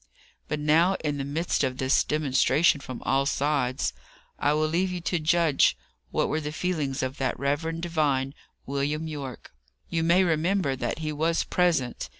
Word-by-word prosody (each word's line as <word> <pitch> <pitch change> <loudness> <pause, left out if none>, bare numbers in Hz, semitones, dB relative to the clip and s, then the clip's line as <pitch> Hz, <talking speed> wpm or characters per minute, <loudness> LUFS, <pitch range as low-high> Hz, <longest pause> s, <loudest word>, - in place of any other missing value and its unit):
But 150 - -2
now, 160 +5 +3
in 145 -2 -1
the - - -1
midst 150 +3 -1
of 130 -1 -1
this 130 +1 +3
demonstration 150 +1 +2
from 130 -2 -8
all 135 +1 +1
sides, 135 - 0 0.5
I 145 - +2
will 155 +1 +1
leave 175 +4 0
you 180 - -3
to 175 0 -1
judge 160 -2 +3 0.3
what - - 0
were 155 - -1
the 150 0 -4
feelings 150 -6 -2
of 130 +2 -3
that 135 - -1
reverend 160 +4 -2
divine, 145 -5 0 0.3
William 145 +3 -2
Yorke. 140 -5 -7 0.4
You 165 - 0
may 170 +3 +4
remember 165 -2 +1
that 120 -2 -3
he 155 - -1
was 160 +3 +1
present. 165 -9 0
150 Hz, 165 wpm, -26 LUFS, 135-165 Hz, 0.5 s, may